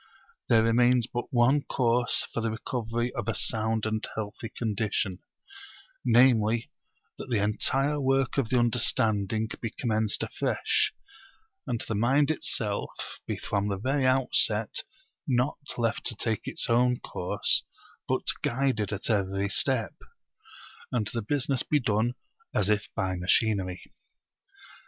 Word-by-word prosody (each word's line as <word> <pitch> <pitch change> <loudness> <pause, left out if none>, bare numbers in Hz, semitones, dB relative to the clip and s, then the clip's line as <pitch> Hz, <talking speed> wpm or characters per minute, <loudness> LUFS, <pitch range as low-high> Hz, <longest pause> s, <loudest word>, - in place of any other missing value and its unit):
There 115 -2 +5
remains 120 +1 +4
but 120 0 -5
one 130 +4 +4
course 120 -2 +2
for 115 - -1
the 115 - 0
recovery 120 +1 -3
of 120 -3 -4
a 115 - 0
sound 110 0 0
and 110 0 -2
healthy 110 +1 -5
condition, 105 -4 -1 0.8
namely, 115 -2 +3 0.5
that - - -7
the 120 - +1
entire 135 +8 +1
work 135 0 +1
of 120 -5 -1
the 125 - +2
understanding 110 -3 +2
be 115 - -2
commenced 110 -2 -1
afresh, - - 0 0.8
and 120 - -1
the - - -2
mind 135 +8 +3
itself 105 -9 -1 0.4
be - - -2
from 100 0 -2
the 100 -1 -2
very 130 +5 0
outset 120 -4 +2 0.5
not 125 +1 +1 0.2
left 115 -1 -1
to 120 - -1
take 110 0 -2
its - - 0
own 125 +1 +3
course, 90 - 0 0.5
but - - 0 0.2
guided 120 -5 0
at 100 -1 -3
every 100 -2 0
step; 120 0 +1 1.0
and 110 -4 0
the 115 - -1
business 135 +2 0
be 150 - +1
done 115 0 0 0.4
as 105 -1 +2
if 105 0 0
by 95 -1 -1
machinery. 95 0 +1
115 Hz, 135 wpm, -27 LUFS, 105-125 Hz, 1.0 s, There